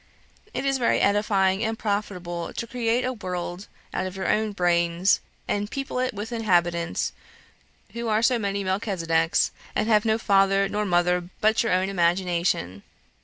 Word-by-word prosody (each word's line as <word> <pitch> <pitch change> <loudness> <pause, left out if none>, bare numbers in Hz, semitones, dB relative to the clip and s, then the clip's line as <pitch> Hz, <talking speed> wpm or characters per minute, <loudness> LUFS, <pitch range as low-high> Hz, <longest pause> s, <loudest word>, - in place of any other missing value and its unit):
It 275 - -3
is 275 -1 +1
very 240 - +2
edifying 200 -1 +2
and 225 0 -1
profitable 180 -5 -3
to - - -4
create 235 0 0
a 255 - -1
world 180 -3 -5 0.3
out 185 - -1
of 185 - -8
your 190 - -3
own 215 0 +1
brains, 175 0 +2 0.3
and 205 0 -1
people 275 -1 -4
it 255 0 0
with 210 +3 -6
inhabitants, 175 -7 0 0.8
who 235 0 -4
are 215 +1 +1
so 245 0 +3
many 200 -1 -2
Melchisedecs, 175 -4 +1 0.2
and 215 - +1
have 215 -2 +4
no 220 -1 +2
father 195 -2 +3
nor 210 +1 -2
mother 175 0 +1
but 220 +1 +3
your 230 - 0
own 185 +1 +2
imagination 175 - 0
195 Hz, 160 wpm, -25 LUFS, 175-220 Hz, 0.8 s, have